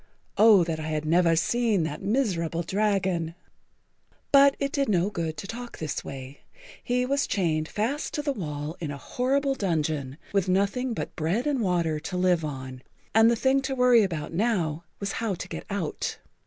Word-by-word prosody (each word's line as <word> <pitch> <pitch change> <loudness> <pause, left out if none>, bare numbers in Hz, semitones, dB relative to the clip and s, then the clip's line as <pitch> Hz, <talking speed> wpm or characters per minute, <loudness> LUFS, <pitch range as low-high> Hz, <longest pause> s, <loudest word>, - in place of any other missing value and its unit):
Oh, 210 -4 +7
that 165 -1 -3
I 155 - -4
had 155 -1 -2
never 165 +1 +4
seen 220 +2 +1
that 150 -1 -4
miserable 180 -8 0
dragon!" 190 -5 0 1.0
But 280 0 +7
it 275 -1 -2
did 280 -4 0
no 190 0 +2
good 160 -4 -3
to 150 - -6
talk 240 +4 -7
this 155 -2 -4
way. 135 0 -8 0.4
He 250 +1 +1
was 280 +2 0
chained 160 -5 0
fast 240 - -2
to 295 - -2
the 290 - 0
wall 150 - -5
in 160 - -4
a 145 - -5
horrible 270 - 0
dungeon, 155 - -1 0.2
with 195 -2 +1
nothing 200 +6 +1
but - - -5
bread 170 +10 0
and 285 -4 0
water 170 -6 +1
to 180 +4 -5
live 180 -2 +2
on, 130 -3 -6 0.3
and 225 +1 +6
the 235 - +3
thing 265 +3 +2
to 270 0 -3
worry 250 -2 +5
about 165 -6 -2
now 170 -6 0
was 200 -1 -2
how 220 -4 0
to 185 - -7
get - - -7
out. 195 -6 -3
185 Hz, 180 wpm, -26 LUFS, 160-235 Hz, 1.0 s, Oh